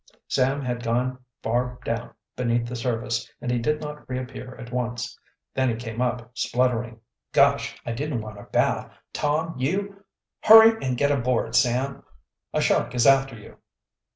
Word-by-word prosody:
Sam 135 +2 +1
had 120 -1 -2
gone 125 +2 -1 0.2
far 125 +2 -1
down 115 +1 -3 0.2
beneath 120 -1 0
the 125 - -5
surface 115 -1 -2
and 125 - -3
he 120 - +1
did 150 +6 0
not 150 -2 -8
reappear 130 0 -6
at 120 -2 -10
once. 120 -1 -3 0.4
Then 130 -1 +1
he 115 - 0
came 115 0 -5
up 125 -1 -2
spluttering. 120 -2 0 0.3
"Gosh! - - +3
I 120 - -2
didn't 130 0 -2
want 110 -1 -9
a - - -11
bath! - - 0 0.2
Tom, 155 +3 0
you 195 +8 -2 0.2
" - - -64
"Hurry 225 +1 +8
and 130 -2 -1
get 140 +3 +2
aboard, 125 -4 0
Sam! 125 +2 +1 0.5
A - - 0
shark - - +1
is 120 - +3
after 135 -2 +4
you!" 105 - -14
125 Hz, 165 wpm, -25 LUFS, 120-135 Hz, 0.5 s, Hurry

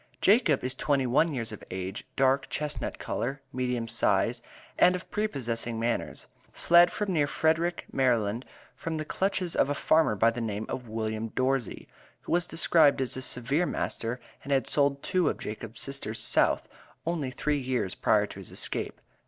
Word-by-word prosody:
Jacob 195 - +4
is 130 0 -1
twenty 140 0 +1
one 150 +7 +3
years 120 -6 -3
of 105 - -9
age, 95 +6 -5
dark 135 +1 +2
chestnut 150 -1 -3
color, 135 +4 -3
medium 125 -2 -1
size, - - +1 0.4
and 180 - +6
of 180 - -8
prepossessing 120 - -2
manners. 115 +1 -2 0.3
Fled 175 +1 +5
from 205 -3 -2
near 150 -4 +2
Frederick, 165 +4 +1
Md., 120 -3 +1 0.3
from 165 -1 -4
the 155 - -3
clutches 185 0 -1
of - - +3
a 145 - 0
farmer 155 -6 +3
by 115 +3 +4
the 120 +1 -5
name 110 -1 -3
of 125 -3 -5
William 110 0 -2
Dorsey, 130 0 -1 0.3
who - - -8
was 175 0 +2
described 160 -3 +4
as 130 -2 0
a 130 - -4
severe 135 +7 0
master, 115 +2 -2 0.2
and 140 - -6
had 135 -1 +3
sold 140 -1 +1
two 180 -5 +2
of - - -3
Jacob's 115 +2 -6
sisters, 135 -5 -3
South, - - +2 0.4
only 160 -5 -1
three 145 +3 -1
years 125 -7 -1
prior - - +2
to - - -10
his - - -8
escape. - - -3
135 Hz, 170 wpm, -28 LUFS, 115-160 Hz, 0.4 s, and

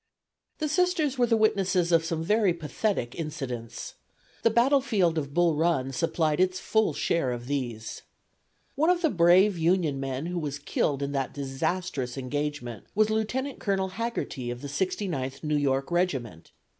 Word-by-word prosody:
The 310 - -1
Sisters 315 -4 +1
were 245 - +4
the 230 -1 +3
witnesses 190 -5 +2
of 165 -1 +4
some 165 -1 -2
very 205 -1 +2
pathetic 160 - -2
incidents. 130 -8 -5 0.5
The - - +4
battlefield 235 - +3
of 140 -2 -5
Bull 175 -1 +4
Run 155 -5 +1
supplied 155 +2 0
its 185 0 +2
full 220 -1 +1
share 165 -7 0
of 120 0 -5
these. 120 -5 -4 0.7
One 310 +4 +2
of 355 -1 +2
the 320 - +3
brave 180 +2 +5
Union 165 -4 +2
men 135 +2 -3
who 175 0 -2
was 145 -3 -3
killed 140 0 -1
in 140 - -2
that 135 -2 -2
disastrous 140 0 -2
engagement 135 -3 -4
was 215 +1 +3
Lieutenant 250 +6 -1
Colonel 190 -2 0
Haggerty, 195 - -3
of 120 0 -5
the 145 - -5
Sixty 190 +7 -1
ninth 135 -5 -4
New 150 -1 0
York 135 0 0
Regiment. 135 - -1
165 Hz, 160 wpm, -27 LUFS, 135-205 Hz, 0.7 s, brave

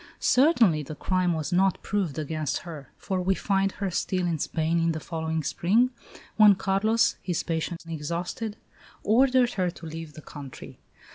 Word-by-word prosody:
Certainly 250 - +4
the 150 +1 -7
crime 185 +2 0
was 155 0 -3
not 190 +1 +3
proved 190 -8 -1
against 155 -1 -2
her; 150 -6 -9
for 190 -1 -2
we 190 +1 +1
find 195 +1 0
her 195 -2 -3
still 185 +1 -1
in 165 -3 -1
Spain 160 +3 0
in 165 0 +1
the 160 - -4
following 160 -1 -3
spring, 220 - +2 0.5
when 210 -2 +8
Carlos, 200 +4 +1
his 175 -4 -2
patience 165 +1 -3
exhausted, 170 +7 -4 0.5
ordered 250 +2 +4
her 180 - +2
to 170 - -10
leave 160 -1 -7
the 155 - -11
country. 140 -3 -10
175 Hz, 160 wpm, -26 LUFS, 160-200 Hz, 0.5 s, when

